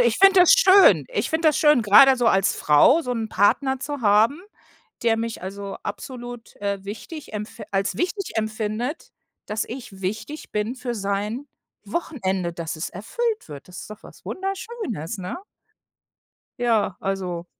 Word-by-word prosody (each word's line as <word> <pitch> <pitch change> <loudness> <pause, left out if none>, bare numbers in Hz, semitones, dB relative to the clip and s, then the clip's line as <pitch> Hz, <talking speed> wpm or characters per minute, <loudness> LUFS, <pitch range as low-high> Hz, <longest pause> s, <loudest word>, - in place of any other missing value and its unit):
ich 235 -2 +2
finde 390 0 +7
das 360 - +7
schön. 400 -5 +6
Ich - - -2
finde 320 0 +3
das 300 - +1
schön, 295 -6 +4
grade 260 +6 +7
so 245 - 0
als 195 -3 +3
Frau 150 - +5
so 250 -6 -3
'n 225 -2 -3
Partner 265 +8 +2
zu 285 +1 -5
haben, 220 +7 +3 0.6
der 225 -1 +3
mich 230 -1 -4
also, 195 +1 -6
absolut, 245 +2 -8
äh, 200 -1 -3
wichtig 245 +9 -8
empf 210 0 -7
als 195 0 -1
wichtig 365 +2 -2
empfindet, 220 +5 -3 0.3
dass 215 +1 -2
ich 235 -5 -9
wichtig 215 +11 -5
bin 210 +4 -2
für 245 -1 -5
sein 205 +6 -3 0.4
Wochenende, 195 - -2
dass 165 -1 -5
es 155 - -5
erfüllt 445 - -3
wird. 145 +2 -10
Das 180 - -9
ist - - -11
doch 215 - -10
was - - -15
Wunderschönes, 385 - -5
ne? 185 - -5 1.2
Ja, 225 -5 +1
also 185 -3 -3
225 Hz, 155 wpm, -23 LUFS, 200-290 Hz, 1.2 s, finde